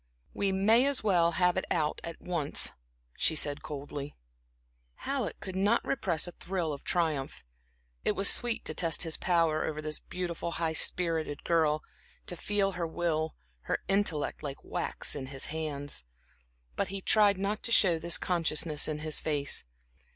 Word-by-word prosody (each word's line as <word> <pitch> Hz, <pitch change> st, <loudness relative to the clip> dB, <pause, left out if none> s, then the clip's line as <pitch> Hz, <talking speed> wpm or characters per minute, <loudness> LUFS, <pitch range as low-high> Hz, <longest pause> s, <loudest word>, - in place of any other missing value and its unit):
"We 200 Hz, -1 st, 0 dB
may 220 Hz, +7 st, +4 dB
as 280 Hz, -4 st, -1 dB
well 175 Hz, -5 st, +3 dB
have 180 Hz, +1 st, +2 dB
it 190 Hz, -, 0 dB
out 155 Hz, -3 st, 0 dB
at 170 Hz, -, -6 dB
once," 170 Hz, -5 st, -2 dB, 0.4 s
she 160 Hz, -, +2 dB
said, 145 Hz, -1 st, +2 dB
coldly. 145 Hz, 0 st, -6 dB, 0.8 s
Halleck 270 Hz, -5 st, -3 dB
could 190 Hz, -1 st, -7 dB
not 205 Hz, +5 st, +2 dB
repress 175 Hz, -, +1 dB
a 175 Hz, -, -2 dB
thrill 175 Hz, -4 st, -3 dB
of 140 Hz, -, -8 dB
triumph. 155 Hz, -6 st, -1 dB, 0.6 s
It -, -, +2 dB
was 200 Hz, 0 st, +2 dB
sweet 240 Hz, -2 st, +2 dB
to -, -, -1 dB
test 165 Hz, -1 st, +2 dB
his 160 Hz, -2 st, 0 dB
power 165 Hz, -3 st, +2 dB
over 155 Hz, -1 st, -3 dB
this 155 Hz, 0 st, -4 dB
beautiful, 170 Hz, -2 st, -4 dB
high 165 Hz, -1 st, -1 dB
spirited 160 Hz, -3 st, +1 dB
girl, 155 Hz, -2 st, +2 dB, 0.4 s
to 175 Hz, -, -2 dB
feel 200 Hz, +2 st, 0 dB
her 175 Hz, -2 st, -3 dB
will, 160 Hz, -1 st, -1 dB, 0.3 s
her -, -, +2 dB
intellect, 195 Hz, -7 st, +1 dB
like 140 Hz, -2 st, -6 dB
wax -, -, -2 dB
in 135 Hz, -2 st, -5 dB
his 135 Hz, 0 st, 0 dB
hands. 145 Hz, -, -2 dB, 0.7 s
But 200 Hz, -, 0 dB
he 195 Hz, +1 st, -5 dB
tried 205 Hz, 0 st, +5 dB
not 200 Hz, +3 st, -2 dB
to 235 Hz, -, -2 dB
show 175 Hz, -7 st, +6 dB
this 170 Hz, +1 st, +3 dB
consciousness 160 Hz, -3 st, +1 dB
in 155 Hz, -, -2 dB
his 155 Hz, -, +1 dB
face. 145 Hz, -, 0 dB
170 Hz, 165 wpm, -30 LUFS, 155-190 Hz, 0.8 s, show